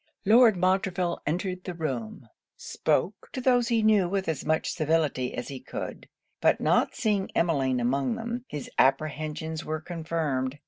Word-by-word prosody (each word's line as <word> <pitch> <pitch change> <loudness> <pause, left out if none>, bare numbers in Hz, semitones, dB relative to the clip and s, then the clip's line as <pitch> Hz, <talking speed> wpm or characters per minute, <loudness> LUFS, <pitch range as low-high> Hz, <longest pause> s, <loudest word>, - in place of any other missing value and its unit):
Lord 225 0 +6
Montreville 185 -1 0
entered 180 +3 -2
the 180 - -5
room; 130 -9 -4 0.3
spoke 195 +2 -1
to - - -3
those 245 -2 +3
he 230 -2 +2
knew 210 -5 +4
with 195 0 -1
as 160 -2 -2
much 155 +1 0
civility 155 -5 0
as 120 - -5
he 135 -2 -6
could; - - -7 0.3
but - - +3
not - - +2
seeing 205 -3 0
Emmeline 135 -7 +1
among 135 - 0
them, 235 +1 -4
his 150 -2 -6
apprehensions 155 +3 0
were 155 0 -3
confirmed. 155 -5 -2
165 Hz, 150 wpm, -27 LUFS, 150-195 Hz, 0.3 s, Lord